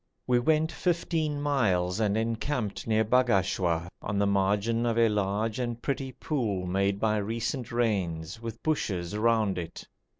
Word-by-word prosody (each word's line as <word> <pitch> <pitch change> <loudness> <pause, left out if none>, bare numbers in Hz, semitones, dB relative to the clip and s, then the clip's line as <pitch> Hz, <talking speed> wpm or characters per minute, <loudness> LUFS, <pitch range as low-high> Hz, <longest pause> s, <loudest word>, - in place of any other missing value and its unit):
We 125 -1 +3
went 155 +5 +2
fifteen 165 -4 -1
miles 95 -10 +1
and 105 -1 +1
encamped 115 0 -2
near 110 0 +3
Bagashwa 95 -8 +2
on 100 -1 -3
the 100 - +3
margin 100 +4 +1
of 115 -1 0
a 115 -1 +5
large 105 +2 -1
and 120 -2 -2
pretty 135 +1 -2
pool 110 - -2
made 100 +2 0
by 110 0 +2
recent 115 +4 -2
rains, 100 -5 -1
with 115 -1 -7
bushes 95 - -1
round 110 -4 +2
it. 85 -1 -7
110 Hz, 145 wpm, -28 LUFS, 100-120 Hz, -, a